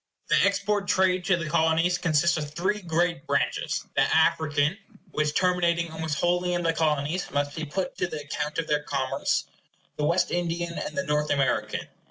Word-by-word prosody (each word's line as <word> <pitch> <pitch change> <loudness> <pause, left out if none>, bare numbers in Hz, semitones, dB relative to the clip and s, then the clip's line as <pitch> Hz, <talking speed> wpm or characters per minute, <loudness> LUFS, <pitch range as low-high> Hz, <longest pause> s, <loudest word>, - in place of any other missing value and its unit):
The - - +4
export 200 0 0
trade 185 -1 +2
to 185 -1 +3
the 170 -2 -4
Colonies 165 +2 +2
consists 165 0 +2
of 150 -2 -3
three 190 +5 0
great 170 -3 -1
branches: 140 -3 0
the - - +4
African 150 0 +2 0.4
which, 150 0 0
terminating 170 -2 +1
almost 160 -2 -3
wholly 180 +1 +1
in 175 - -1
the 165 -1 +2
Colonies, 155 +2 0
must 145 0 -1
be 160 -1 -3
put 180 +5 -4
to - - +1
the 155 -4 -5
account 150 +1 -4
of 165 - 0
their 150 -1 +1
commerce, 135 -3 -1 0.5
the 150 - -2
Wes 170 +4 +3
the 175 - -1 0.6
North 150 -1 0
American. 135 -2 0
160 Hz, 170 wpm, -26 LUFS, 150-180 Hz, 0.6 s, The